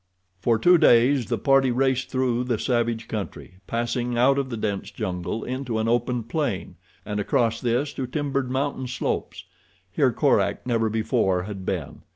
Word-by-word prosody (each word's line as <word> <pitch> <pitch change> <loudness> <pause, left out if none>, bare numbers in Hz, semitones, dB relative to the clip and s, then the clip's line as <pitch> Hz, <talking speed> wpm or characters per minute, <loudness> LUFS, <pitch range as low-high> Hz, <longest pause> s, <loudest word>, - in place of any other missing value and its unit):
For 115 +3 +2
two 175 +9 +5
days 125 -3 +4
the - - -1
party 135 -2 +3
raced 130 +1 +1
through 125 -2 0
the 120 -3 0
savage 115 -2 -1
country, 100 -3 -6
passing 120 +1 -1
out 135 +3 +4
of 135 -1 -2
the 115 - -4
dense 100 -2 -3
jungle 95 +1 -4
into 125 -2 -3
an 110 0 0
open 120 +1 0
plain, 110 - -3 0.3
and 105 0 -3
across 115 +2 +1
this 125 +4 0
to 130 - -4
timbered 140 -1 -2
mountain 130 0 -2
slopes. 125 -1 -3 0.5
Here - - +2
Korak - - +1
never 115 -3 +1
before 110 -4 +1
had 95 -2 -7
been. 75 -5 -4
120 Hz, 165 wpm, -24 LUFS, 110-130 Hz, 0.5 s, two